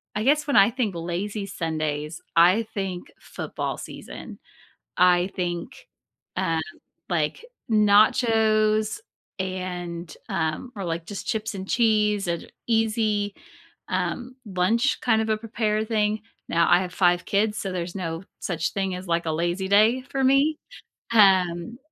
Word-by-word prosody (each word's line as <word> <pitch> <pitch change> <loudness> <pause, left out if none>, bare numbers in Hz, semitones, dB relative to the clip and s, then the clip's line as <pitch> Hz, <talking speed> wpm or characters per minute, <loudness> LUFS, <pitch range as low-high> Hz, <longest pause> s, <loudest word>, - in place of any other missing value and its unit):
I 210 - 0
guess 295 +4 +3
when 285 - +1
I 200 +2 +7
think 235 -5 -1
lazy 190 +5 -3
Sundays, 155 -3 -3
I 185 +7 +5
think 190 -3 -4
football - - -5
season. - - -9 0.6
I 180 +1 +4
think, 175 - -4 0.5
uh, 165 -4 +1 0.5
like, 160 - -1 0.3
nachos 215 - +3 0.4
and, 180 -2 -4
um 160 +9 -2
or, 195 - -4
like, 165 -1 -3
just 200 +1 -7
chips 220 -1 -2
and 190 0 -7
cheese 210 -4 +2
and 170 -1 -4 0.2
easy, 215 -3 +1 0.5
um, 255 0 -2
lunch 210 +7 +1
kind 225 -3 +2
of 220 - -3
a 215 - +3
prepared 215 -1 -1
thing. 215 -1 +1 0.3
Now 170 0 +3
I 175 - +6
have 180 -1 -6
5 175 -1 +3
kids, 210 +1 +1
so, 195 - -3
there's 175 -1 -4
no 165 -2 -4 0.2
such 165 -3 -2
thing 195 -2 -1
as, 180 +1 -8
like, 170 0 0
a 160 - 0
lazy 175 +4 -1
day 215 +6 +4
for 270 - -1
me. 275 +4 +3 0.6
Um, 190 0 +4
195 Hz, 140 wpm, -25 LUFS, 175-220 Hz, 0.6 s, I